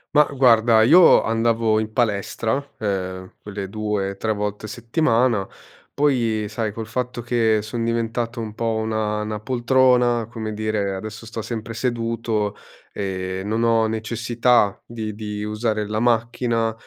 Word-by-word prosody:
Ma 150 - +8
guarda, 115 -4 +5
io 170 +9 +7
andavo 115 -1 +1
in 110 0 -2
palestra, 115 +3 -1
ehm, 95 -3 -3
quelle 100 -1 -6
due, 105 -1 -2
tre, 110 +2 -2
volte 105 0 -3
a - - -7
settimana, 120 - +1 0.5
poi 120 -7 +1
sai, 110 0 -3
col 110 +1 -6
fatto 125 +1 -3
che 115 -2 +2
son 115 +2 -4
diventato 115 +1 -2
un 110 -2 -5
po' 115 -1 -1
una 110 -1 -1
una 105 0 -4
poltrona 125 -1 +3
come 110 -2 -5
dire, 105 -2 -1
adesso 110 +3 -7
sto 115 0 -5
sempre 115 0 -5
seduto, 115 -3 -1 0.4
e, 95 -1 -3
non 110 +3 -1
ho 115 -1 +3
necessità 115 0 +1
di 110 -2 -5
di 105 -1 -5
usare 105 0 -1
la 105 +1 -2
macchina, 115 -1 +1
110 Hz, 140 wpm, -22 LUFS, 105-120 Hz, 0.5 s, Ma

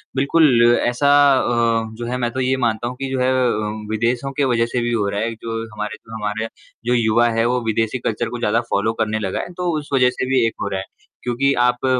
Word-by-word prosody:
बिल्कुल 135 -4 +4
ऐसा 125 +4 +1 0.3
अ, 115 -2 +1
जो 120 +1 -6
है 125 - -2
मैं 120 -1 -1
तो 130 - -4
ये 130 +1 +1
मानता 120 -2 0
हूँ 125 - -5
कि 135 - -2
जो 130 - -1
है 130 +1 +2
अ, 110 -4 -1
विदेशों 120 +5 -1
के 145 - +2
वज़ह 120 -2 +2
से 120 +1 -2
भी 120 0 -1
हो 105 -3 +1
रहा 100 - -2
है। 115 +1 -2
जो 115 0 -5
हमारे 105 0 -4
जो 115 - -15
हमारे 105 0 -3
यहाँ 115 - -4 0.4
जो 120 - +2
युवा 120 0 +3
है 115 - +3
वो 125 +1 +1
विदेशी 115 +2 0
कल्चर 115 0 -2
को 120 - -5
ज़्यादा 115 0 +1
फॉलो 110 +3 +1
करने 110 0 0
लगा 95 -3 -2
है, 175 - -6
तो 180 0 -2
उस 145 - -11
वज़ह 125 -2 +4
से 130 - -3
भी 130 -3 +3
एक - - -3
हो - - -1
रहा 95 -1 -2
है 95 - -6 0.4
क्योंकि 125 +3 +1
आप 125 +1 +1
120 Hz, 250 wpm, -20 LUFS, 110-125 Hz, 0.4 s, बिल्कुल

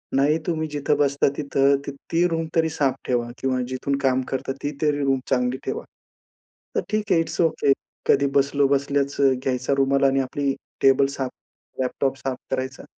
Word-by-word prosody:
नाही 145 +4 +3
तुम्ही 160 -2 -1
जिथं 145 -1 0
बसता 140 -1 +2
तिथं, 140 -1 +3
ती 165 +5 0
रूम 165 -1 -1
तरी 160 0 +3
साफ 140 -4 0
ठेवा 120 -1 0
किंवा 130 -1 0
जिथून 130 +2 -1
काम 130 -1 +2
करता, 130 0 -2
ती, 145 - -1
तरी 150 -1 +2
रूम 135 -1 +2
चांगली 125 0 +1
ठेवा. 455 +2 -3 0.9
तर - - +2
ठीक 215 -1 -1
आहे. 165 - +5
It's 165 - -5
okay. 155 -3 +2 0.4
कधी 140 0 +4
बसलो 140 0 +3
बसल्याच 140 0 0
घ्यायचा 130 -1 +1
रुमाल 140 0 +2
आणि 135 0 +3
आपली 135 +1 -1 0.3
टेबल 135 0 +5
साफ, 130 -2 -2 0.5
लॅपटॉप 135 +1 -1
साफ 130 -1 -3
करायचा. 130 0 -3
140 Hz, 165 wpm, -23 LUFS, 130-145 Hz, 0.9 s, आहे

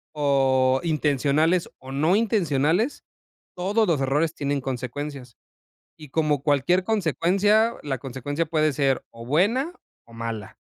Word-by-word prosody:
o 135 -3 +2
intencionales 155 +2 +1
o 130 +1 -10
no 155 +7 +2
intencionales, 195 - +1 0.5
todos 205 +5 +1
los 160 -6 +1
errores 150 +4 +1
tienen 140 0 -1
consecuencias 130 0 -6 0.6
y, 150 -3 -12
como 150 -3 0
cualquier 155 +6 +2
consecuencia, 205 +3 +2
la 135 -3 -3
consecuencia 140 +5 -3
puede 155 -1 +1
ser 135 -2 +1
o 115 0 -11
buena 230 - +1 0.3
o 115 - -18
mala. 115 -3 -6
150 Hz, 125 wpm, -24 LUFS, 135-180 Hz, 0.6 s, o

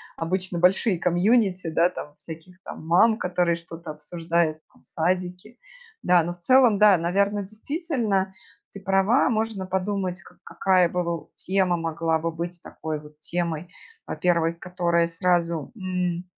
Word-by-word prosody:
обычно 180 +1 -2
большие 185 +3 +3
комьюнити, 185 +1 +2
да, 165 +2 +3
там 150 -4 -9
всяких 170 +3 -9
там - - -9
мам, 215 +6 +5
которые 180 -3 0
что-то 165 -1 -9
обсуждают 165 +1 -1
там, - - -25
садики. 180 +6 -3 0.4
Да, 180 -2 +4
но 170 - -3
в 175 - -9
целом, 250 +2 +5
да, 210 -2 +6
наверно, 200 +5 +1
действительно 215 - -2 0.4
ты 200 - -9
права, 195 +7 +3
можно 220 -4 -1
подумать, 190 -1 -2
как - - -18
какая 185 -2 +2
бы, 180 +1 -2
воу, 170 -1 -4
тема 185 -1 +1
могла 165 -1 -1
бы 165 +1 -2
быть 170 +1 -5
такой 155 -1 -5
вот 150 0 -16
темой. 170 0 -2 0.4
Во-первых, 170 -1 0
которая 170 -2 0
сразу, 170 0 0
м, 180 -3 -2
180 Hz, 145 wpm, -24 LUFS, 170-195 Hz, 0.4 s, да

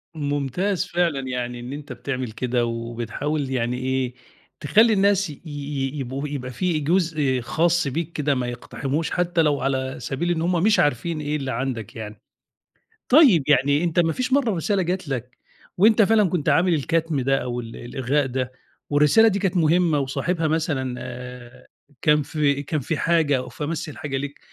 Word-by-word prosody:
ممتاز 145 +6 -1
فعلًا، 170 -5 0
يعني 125 -1 -3
إن 125 +3 -7
أنت 145 0 -7
بتعمل 130 -4 -4
كده 120 +1 -1
وبتحاول 120 +5 -3
يعني 125 -1 -1
إيه، 130 -1 -1 0.5
تخلّي 220 +9 +4
الناس 200 -2 +3
ي 145 - -10
ي 145 -1 -4
يبقوا 135 +3 -4
يبقى 130 -3 -5
في 175 +2 -1
جزء 155 -5 +1
خاص 170 +5 +1
بيك 165 +4 -3
كده 145 -3 0
ما 125 -1 -2
يقتحموش 135 +5 -3
حتى 175 -1 +1
لو 150 -2 +1
على 130 -1 -1
سبيل 170 +6 -2
إن 160 -2 0
هم 175 0 +1
مش 215 0 +4
عارفين 150 +4 0
إيه 150 +1 -2
اللي 135 -2 -3
عندك 125 -6 -4
يعني 105 -1 -8 0.9
طيب 250 - +6
يعني 145 +2 +3
أنت 170 0 +1
ما 165 -2 +2
فيش 255 +1 -2
مرّة 265 -6 +3
رسالة 190 +4 0
جات 180 -1 -2
لك 125 -2 -5 0.4
وأنت 220 +3 +5
فعلًا 210 -2 +4
كنت 160 -3 0
عامل 170 +4 +3
الكتم 160 -1 0
ده 135 +1 +2
أو 125 0 -3
ال 115 -1 -8
الإلغاء 130 +3 -1
ده 130 0 -3 0.4
والرسالة 150 +10 +5
دي 200 -1 +1
كانت 190 -1 0
مهمة 165 -1 +3
وصاحبها 160 +5 -1
مثلًا 145 -5 -1
آآ 125 0 -9 0.3
كان 150 -1 +4
في 145 -1 0
كان 155 +1 -2
في 145 +4 -2
حاجة 160 -5 +2
أو 125 0 -5
في 140 +5 -7
أمَس 160 +1 -3
الحاجة 135 +1 -4
ليك 145 +1 -5
145 Hz, 175 wpm, -23 LUFS, 130-170 Hz, 0.9 s, طيب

